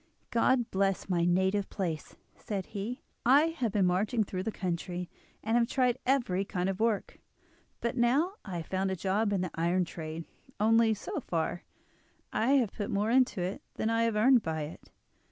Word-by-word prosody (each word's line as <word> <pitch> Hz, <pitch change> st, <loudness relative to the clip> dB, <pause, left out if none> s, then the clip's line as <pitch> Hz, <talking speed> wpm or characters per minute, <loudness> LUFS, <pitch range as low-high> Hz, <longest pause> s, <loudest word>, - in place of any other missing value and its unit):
"God 240 Hz, 0 st, +2 dB
bless 195 Hz, 0 st, 0 dB
my 170 Hz, -2 st, +2 dB
native 190 Hz, +3 st, +2 dB
place," 165 Hz, -6 st, -4 dB, 0.2 s
said 195 Hz, -3 st, -4 dB
he. 230 Hz, +6 st, -4 dB, 0.2 s
"I 285 Hz, +6 st, +5 dB
have 230 Hz, -4 st, +1 dB
been 200 Hz, -2 st, +2 dB
marching 205 Hz, +6 st, +2 dB
through 185 Hz, -2 st, -4 dB
the 220 Hz, -, -2 dB
country, 180 Hz, -2 st, -3 dB, 0.3 s
and 225 Hz, +2 st, +1 dB
have 235 Hz, -1 st, +4 dB
tried 250 Hz, -1 st, +1 dB
every 235 Hz, -9 st, +2 dB
kind 185 Hz, -2 st, -2 dB
of 195 Hz, 0 st, -3 dB
work, 220 Hz, -2 st, 0 dB, 0.6 s
but 235 Hz, -, -1 dB
now 270 Hz, +10 st, +2 dB
I 185 Hz, -4 st, -5 dB
have 165 Hz, -, -5 dB
found 190 Hz, +2 st, -1 dB
a 190 Hz, -, -1 dB
job 200 Hz, +4 st, 0 dB
in 195 Hz, -3 st, +1 dB
the 185 Hz, -, -3 dB
iron 175 Hz, +2 st, +1 dB
trade; 160 Hz, -1 st, -6 dB, 0.3 s
only, 225 Hz, +1 st, +4 dB
so -, -, -4 dB
far, 170 Hz, +1 st, -2 dB, 0.7 s
I 235 Hz, +5 st, +2 dB
have 245 Hz, -7 st, +3 dB
put 205 Hz, -, -4 dB
more 205 Hz, +3 st, 0 dB
into 250 Hz, -6 st, +3 dB
it 185 Hz, +3 st, -3 dB
than 220 Hz, -, 0 dB
I 230 Hz, 0 st, +2 dB
have 230 Hz, -2 st, 0 dB
earned 245 Hz, +3 st, +5 dB
by 160 Hz, -4 st, -2 dB
it. 150 Hz, -, -10 dB
200 Hz, 185 wpm, -30 LUFS, 180-230 Hz, 0.7 s, I